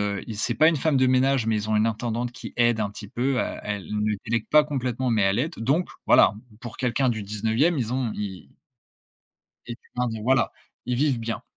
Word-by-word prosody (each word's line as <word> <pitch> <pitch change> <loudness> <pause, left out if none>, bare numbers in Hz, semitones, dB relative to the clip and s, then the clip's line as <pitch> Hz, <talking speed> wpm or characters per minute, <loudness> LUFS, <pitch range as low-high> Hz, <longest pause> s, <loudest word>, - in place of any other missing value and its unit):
heu, 100 -1 -2
i 110 - -6
c'est 115 +3 -1
pas 155 +4 +5
une 165 - +2
femme 150 0 +1
de 130 0 +4
ménage, 130 -1 +2
mais 110 -1 +1
ils 105 +1 -3
ont 110 - +2
une 105 +1 +3
intendante 120 +2 -2
qui - - -9
aide 120 -2 +3
un 105 -2 -1
petit 105 0 -10
peu, 125 +3 0
à - - -4
elle 105 -2 -4
ne 105 0 -1
délègue 115 -1 -1
pas 150 0 +6
complètement 130 -3 -2
mais 110 -2 +2
elle 95 +2 +2
aide 160 +7 -1
donc 140 +10 +1 0.2
voilà. - - +6 0.3
Pour 120 -3 -8
quelqu'un 130 +1 0
du 110 -3 -1
19e 110 - 0
ils 120 0 -2
ont 125 -4 -1
ils 100 -3 -6 1.2
était 120 0 -7 0.2
un 125 0 0
des 110 -1 -5
voilà. 130 +2 +2 0.3
Ils 125 0 -1
vivent 140 -1 +1
bien 115 0 -4
120 Hz, 225 wpm, -25 LUFS, 110-130 Hz, 1.2 s, pas